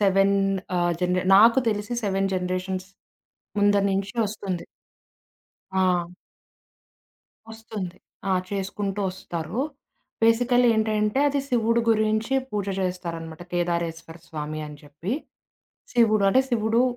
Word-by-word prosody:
7 195 0 +4 0.4
ఆహ్, 175 0 +2
జనరే 180 0 +1
నాకు 230 +5 +7
తెలిసి 210 +3 -3
7 195 -1 +1
జనరేషన్స్ 185 +1 -2 0.7
ముందర 205 0 +4
నుంచి 195 0 -1
వస్తుంది. 195 -4 -4 1.1
ఆ! 185 -2 +2 1.5
వస్తుంది. 220 -5 -7 0.3
ఆ! - - +3 0.2
చేసుకుంటూ 200 0 -3
వస్తారు. 185 +3 -4 0.6
బేసికల్లీ 245 +2 +4
ఏంటంటే, 215 +2 +1
అది 285 0 +1
శివుడి 230 -1 +2
గురించి 220 +2 +2 0.2
పూజ 205 -4 -2 0.2
చేస్తారనమాట 170 -3 -4
కేదారేశ్వర 170 -1 -2
స్వామి 155 0 -5
అని 150 0 -10
చెప్పి. 150 +9 -4 0.8
శివుడు, 220 -4 +4
అంటే 260 +6 +5
శివుడు, 225 -1 +2
195 Hz, 105 wpm, -25 LUFS, 180-220 Hz, 1.5 s, నాకు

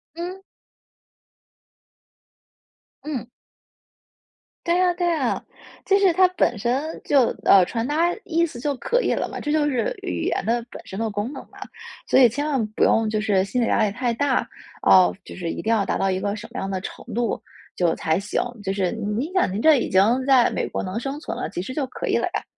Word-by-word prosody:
嗯。 360 +3 -6 2.6
嗯。 270 -7 -4 1.4
对 345 +1 +2
啊 365 -1 +3
对 350 0 0
啊， 285 -7 -1 0.4
其 395 - +5
实 385 -3 +4
它 370 +2 +5
本 335 -10 +1
身 260 +8 -2
就， 270 -5 +3
呃， 190 -2 +7
传 230 +4 -3
达 330 +4 +1
意 335 0 +2
思 300 -7 -8
就 285 +3 -1
可 485 - 0
以 - - 0
了 - - -1
嘛。 - - -7
这 295 - -3
就 300 -1 +2
是 250 -6 -1
语 90 -2 -3
言 - - -1
的 235 +2 0
本 - - -10
身 190 - -7
的 225 0 -1
功 210 +6 -3
能 270 - -7
嘛， - - -18 0.5
所 - - +4
以 250 -3 +7
千 285 +6 -3
万 270 -6 0
不 215 - -1
用 225 -1 +3
就 215 0 0
是 205 -3 +2
心 225 +6 -2
理 235 - +2
压 225 - +2
力 210 - +1
太 245 +2 -1
大， 270 +2 0 0.4
哦， 185 -1 +6
就 - - -10
是 175 -3 -4
一 - - -5
定 220 - 0
要 215 -3 +2
达 - - -1
到 195 - +1
一 185 - -1
个 200 +1 -2
什 215 +1 -8
么 - - -4
样 195 - -3
的 190 -1 -2
程 - - -8
度 235 -1 -1 0.3
就 170 -2 +1
才 160 +2 0
行， 200 +1 -2 0.2
就 195 - -1
是 195 -2 0
您 230 - -3
想 370 - +2
您 195 - -3
这 310 +4 +6
已 - - -2
经 190 - +4 0.3
在 260 -3 +5
美 - - -2
国 - - -4
能 190 +4 -3
生 275 +4 -4
存 - - -5
了， - - -4
其 - - -6
实 255 - -6
就 275 -1 -2
可 - - -6
以 - - +1
了 - - 0
呀， - - -2
240 Hz, 235 characters per minute, -23 LUFS, 205-300 Hz, 2.6 s, 呃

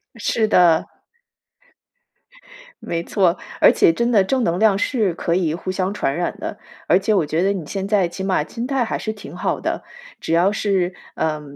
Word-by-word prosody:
是 225 -1 0
的。 170 -5 +4 2.0
没 170 0 -3
错， 180 -2 +1 0.2
而 - - +7
且 - - +4
真 235 +8 0
的 215 -5 +4
正 255 +6 0
能 170 +1 0
量 210 -1 +4
是 210 -4 0
可 170 0 -1
以 170 -4 0
互 175 +3 -6
相 185 +1 -2
传 140 -9 -1
染 175 +1 -2
的， - - -5 0.3
而 180 - +5
且 215 +3 0
我 185 -6 +2
觉 160 +3 -1
得 195 - +2
你 190 -6 -4
现 195 +5 -4
在 200 -3 +2
起 190 +3 -7
码 190 -4 +1
心 230 +10 -5
态 270 -3 0
还 - - -2
是 220 - -3
挺 210 -2 -10
好 - - -2
的， - - -3 0.4
只 - - -4
要 175 +4 +4
是， 195 -4 0 0.2
呃 155 -1 -1
190 Hz, 210 characters per minute, -20 LUFS, 170-210 Hz, 2.0 s, 而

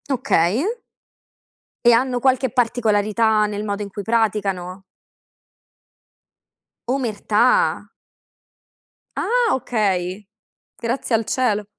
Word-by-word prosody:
Okay. 225 - +1 1.2
E 240 - +7
hanno 250 +1 +1
qualche 260 0 +1
particolarità 220 -3 +1
nel 205 0 -4
modo 205 -1 -3
in 205 - -5
cui 200 +1 -7
praticano? 195 -4 -1 2.1
Omertà? 250 - +1 1.4
Ah, 485 -1 +1
okay. 200 -6 -2 0.5
Grazie 235 0 -1
al 225 0 -1
cielo. 215 -5 0
220 Hz, 80 wpm, -21 LUFS, 205-250 Hz, 2.1 s, E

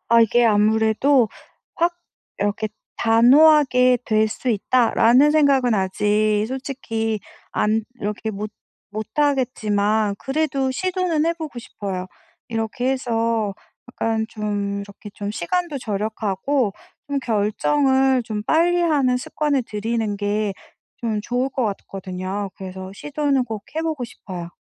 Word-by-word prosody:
아 235 0 +6
이게 235 +2 +4
아무래도 220 +4 +3 0.5
확 345 +1 +1 0.4
이렇게 205 +2 -1 0.3
'단호하게 255 +1 +5
될 215 -1 +2
수 250 +3 -5
있다.'라는 245 +4 +4
생각은 275 -6 +3
아직 210 +2 +1
솔직히 235 -5 -3 0.3
안 215 +1 +1 0.2
이렇게 210 +2 -3
못 210 +1 -5 0.4
못하겠지만 215 -4 0
그래도 275 -2 -1
시도는 360 +1 0
해 335 - +3
보고 315 -6 -7
싶어요. 195 -5 -5 0.4
이렇게 230 +3 -1
해서 230 -5 0 0.4
약간 225 -2 -1
좀 205 -2 -3
이렇게 200 +1 -10
좀 205 0 -4
시간도 300 - -2
절약하고 215 +2 -1 0.4
좀 285 -1 0
결정을 265 +4 +2
좀 215 -3 -4
빨리하는 315 -4 +2
습관을 280 +1 -1
들이는 220 -1 -2
게 205 0 -1 0.5
좀 215 -2 0
좋을 245 +5 -1
것 260 -1 -1
같거든요. 195 -1 -4
그래서 190 0 -7
시도는 285 +1 0
꼭 220 -4 -6
해 320 - -1
보고 310 -6 -2
싶어요. 180 -6 -8
225 Hz, 260 characters per minute, -22 LUFS, 210-270 Hz, 0.5 s, 아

